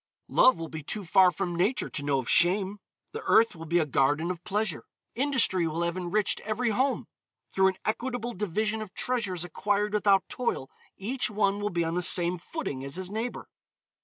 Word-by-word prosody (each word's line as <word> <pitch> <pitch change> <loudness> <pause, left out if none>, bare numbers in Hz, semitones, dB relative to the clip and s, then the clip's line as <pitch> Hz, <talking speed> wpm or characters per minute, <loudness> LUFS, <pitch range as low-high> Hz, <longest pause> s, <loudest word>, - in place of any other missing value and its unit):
Love 255 - +5
will 165 0 -5
be 160 0 -7
too 200 +7 -5
far 185 +2 +6
from 180 -1 -3
Nature 195 +9 +1
to - - -5
know 145 -1 +1
of 130 -3 -3
shame. 190 +3 +3 0.3
The 450 - -6
earth 230 -3 +5
will 165 0 -9
be 170 +2 +2
a 165 - +3
garden 145 +5 +1
of 175 -1 -7
pleasure. 210 -5 -2 0.3
Industry 245 - +1
will 165 +2 -2
have 170 0 -1
enriched 185 +3 0
every 225 +3 -1
home. 260 +5 0 0.5
Through 190 0 +4
an 190 - +1
equitable 240 +1 -2
division 210 +2 -1
of 210 -4 -8
treasures 205 -9 -2
acquired 205 +4 -1
without 200 -2 +3
toil, 235 - -3 0.3
each 220 +2 -1
one 205 -1 +1
will 205 0 -1
be 175 -2 0
on 165 - -2
the 180 - 0
same 175 +1 +2
footing 170 - -5
as 140 +2 -5
his 185 0 -4
neighbor. 225 +3 -4
190 Hz, 190 wpm, -28 LUFS, 170-215 Hz, 0.5 s, far